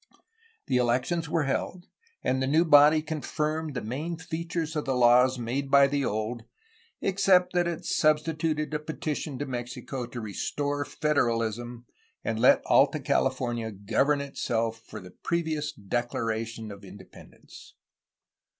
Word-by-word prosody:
The 130 - +1
elections 125 +7 0
were 165 -1 +1
held, 175 +6 -3 0.4
and 130 +1 0
the 130 - 0
new 160 +5 +3
body 150 0 +6
confirmed 155 0 -3
the - - -3
main 150 +10 -4
features 160 0 -4
of 150 - -2
the 135 - 0
laws 125 +1 +5
made 125 +4 -3
by 140 0 +7
the 140 0 0
old, 110 +1 -2 0.6
except 185 -2 +3
that 175 -1 +2
it 170 0 -4
substituted 155 0 +1
a 150 - 0
petition 150 -2 -4
to 145 - -3
Mexico 125 0 -5
to 120 0 -7
restore 145 +7 -3
federalism 120 -4 -1 0.4
and 110 -1 -2
let 125 - +5
Alta - - +4
California 120 -4 0
govern 115 +9 +1
itself 115 -5 -2
for 110 - -8
the 90 -2 -12
previous 155 - -2
declaration 115 0 -3
of 100 0 -11
independence. 95 0 -14
135 Hz, 135 wpm, -27 LUFS, 120-155 Hz, 0.6 s, by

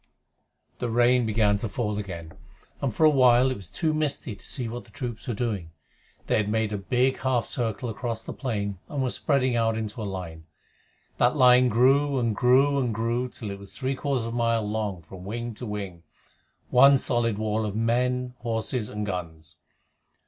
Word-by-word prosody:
The 120 - -2
rain 120 +1 +3
began 105 -2 +2
to 110 - -3
fall 105 -2 -2
again, 85 -6 -7 0.5
and 135 - 0
for 110 - -1
a - - +8
while 130 -1 +5
it - - -2
was 95 -6 -10
too 160 -2 -1
misty 145 -7 -2
to - - -19
see 125 -4 -2
what 120 +2 -6
the - - -19
troops 120 0 -6
were 120 - -2
doing. 100 -8 -3 0.5
They - - +1
had 105 -1 0
made 110 -1 0
a - - -1
big 125 +6 +1
half 130 -3 +1
circle 120 0 -2
across 115 0 -4
the - - -5
plain, 100 -7 -3
and 140 -3 -2
were 125 - 0
spreading 130 -4 +1
out 115 -1 +1
into 110 +1 -4
a - - -3
line. 80 -4 -7 0.7
That 120 +4 +3
line 125 -1 +6
grew 135 +5 +3
and 115 -3 0
grew 135 +5 +4
and 125 -3 0
grew 120 +3 -1
till 110 -4 -7
it 100 - -7
was 100 -1 -12
three 130 0 -2
quarters 135 -3 -1
of 115 - -4
a - - -3
mile 115 -2 +1
long 105 -5 -3
from 90 +3 -11
wing 120 +4 -4
to 120 +3 -7
wing 100 -5 -5 0.7
one 135 +2 +7
solid 120 -4 0
wall 110 0 -1
of 105 -1 -3
men, 125 +2 0
horses, 115 -1 -2
and 105 0 -4
guns. 80 -5 -6
115 Hz, 195 wpm, -26 LUFS, 105-125 Hz, 0.7 s, a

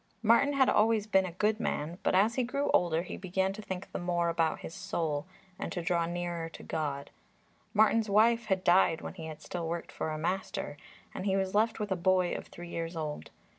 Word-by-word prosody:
Martin 235 +6 +5
had 270 -2 +4
always 220 0 +3
been 190 -3 +3
a - - -6
good 210 +4 +1
man, 170 -5 -2
but - - +1
as 210 +5 +4
he 255 - 0
grew 275 +4 -1
older 170 -1 +2
he - - -7
began 190 +1 -1
to 215 - -7
think 190 -3 -6
the - - -3
more 175 -1 0
about 165 -1 0
his - - -7
soul 165 -5 -2 0.3
and - - -4
to - - -3
draw 170 -1 +1
nearer 175 -1 -3
to - - -11
God. 145 -3 -3 0.6
Martin's 220 0 +3
wife 230 +3 +4
had 190 -2 +1
died 175 -2 +4
when - - -6
he 160 -4 -7
had 155 -1 -9
still 170 -2 -4
worked 170 0 -4
for - - -3
a 155 - -3
master, 185 0 -2 0.4
and 190 - -4
he 190 - +2
was 190 -1 -1
left 220 +2 +2
with 210 -2 -3
a - - +3
boy 185 0 +2
of - - -5
three 175 0 -10
years 165 0 -4
old. 155 -2 -4
185 Hz, 220 wpm, -31 LUFS, 170-210 Hz, 0.6 s, Martin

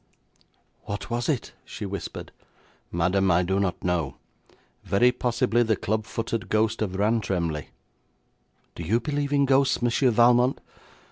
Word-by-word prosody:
'What 100 +3 -5
was 120 +3 -1
it?' 140 -6 -2
she 105 - -7
whispered. 100 -3 -6 0.6
'Madam, 95 +3 +1
I 90 +1 +3
do 95 +2 0
not 95 -3 -2
know. 85 -7 -1 0.7
Very 120 +6 +3
possibly 120 -1 +1
the 110 -2 +2
club 110 +2 -2
footed 115 0 -3
ghost 110 +1 +1
of 95 -3 -2
Rantremly.' 95 -7 0 1.1
'Do - - -8
you 100 +8 +1
believe 145 0 -2
in 140 -1 +3
ghosts, 135 0 +3
Monsieur 120 +2 +2
Valmont?' 120 +2 +4
110 Hz, 135 wpm, -25 LUFS, 95-120 Hz, 1.1 s, Valmont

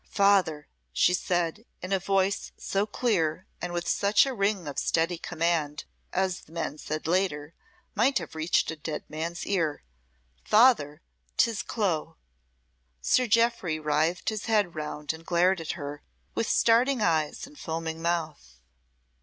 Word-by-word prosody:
"Father," 195 -8 +3 0.2
she 175 - +3
said, 175 +2 -1 0.2
in 185 +2 -2
a 195 - +2
voice 195 +1 0
so 200 +2 -1
clear, 185 -7 0 0.2
and 175 - -3
with 175 0 -3
such 205 +3 +4
a 270 - -2
ring 200 -6 0
of 140 -4 -3
steady 165 +1 0
command, 160 -4 -1 0.3
as, 190 0 0
the 160 - -19
men 165 -2 -4
said 155 +1 -4
later, 160 -3 0 0.4
might 245 +5 +3
have - - -5
reached 160 +2 +1
a - - -5
dead 150 0 -5
man's 165 +3 -4
ear. 165 - -1 0.6
"Father, 210 - +4 0.3
'tis 230 -4 +2
Clo!" 185 - -2 0.8
Sir 250 - +2
Jeoffry 230 -7 +2
writhed 155 +5 0
his 215 -2 -4
head 210 -6 +2
round 150 -1 -4
and 160 +1 -11
glared 180 +1 +2
at 160 - -3
her, 145 0 -6 0.3
with 230 - -1
starting 240 +2 +3
eyes 160 -5 0
and 285 +1 -15
foaming 160 0 -4
mouth. 155 - -3
175 Hz, 145 wpm, -27 LUFS, 155-200 Hz, 0.8 s, such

